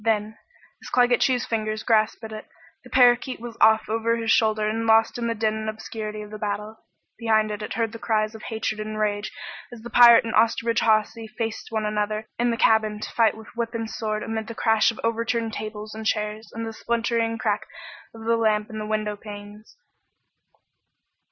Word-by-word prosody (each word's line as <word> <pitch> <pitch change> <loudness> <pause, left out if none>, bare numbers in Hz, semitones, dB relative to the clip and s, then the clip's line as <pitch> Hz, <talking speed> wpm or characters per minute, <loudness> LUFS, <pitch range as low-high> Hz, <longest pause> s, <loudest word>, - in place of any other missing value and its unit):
Then, 220 -1 0 0.4
as - - -9
Claggett 245 0 +3
Chew's 250 -2 +2
fingers 215 -1 -2
grasped 220 0 +2
at 220 - -7
it, 215 0 -8 0.4
the - - -14
parakeet 250 0 +4
was 235 0 -8
off 220 0 +5
over 230 +1 0
his 225 -1 0
shoulder 215 -1 +3
and 225 +1 -2
lost 225 +2 +4
in 235 - -1
the 230 - -1
din 215 0 0
and 220 0 -3
obscurity 215 -1 -6
of 210 - -12
the 215 - -7
battle. 210 +1 -4 0.4
Behind 220 -2 +2
it 210 0 -5
it - - -5
heard 225 -1 0
the 230 - -9
cries 215 -1 0
of 220 - -10
hatred 220 -1 -3
and 215 0 -5
rage 210 -1 -1 0.4
as 235 -2 -11
the 240 - -8
pirate 235 -1 +8
and 225 - -3
Osterbridge 230 0 +2
Hawsey 220 0 +1
faced 225 0 -4
one 220 -1 -2
another 210 +1 -1
in 240 0 +2
the 230 - 0
cabin 215 -2 +3
to - - -6
fight 225 -2 +2
with 220 +1 -13
whip 235 0 -3
and 225 -1 -2
sword 215 -1 -3
amid 220 -1 -4
the 230 - -7
crash 220 -1 +3
of 230 - -5
overturned 230 0 -1
tables 215 0 -6
and 220 0 -7
chairs 210 0 -2
and 230 0 -5
the 225 - -5
splintering 230 0 -1
crack 210 -2 -1 0.5
of 225 0 -10
the 230 0 +2
lamp 215 -1 +1
and 215 0 -5
the 210 - -5
windowpanes. 210 0 -5
220 Hz, 200 wpm, -24 LUFS, 215-230 Hz, 0.5 s, pirate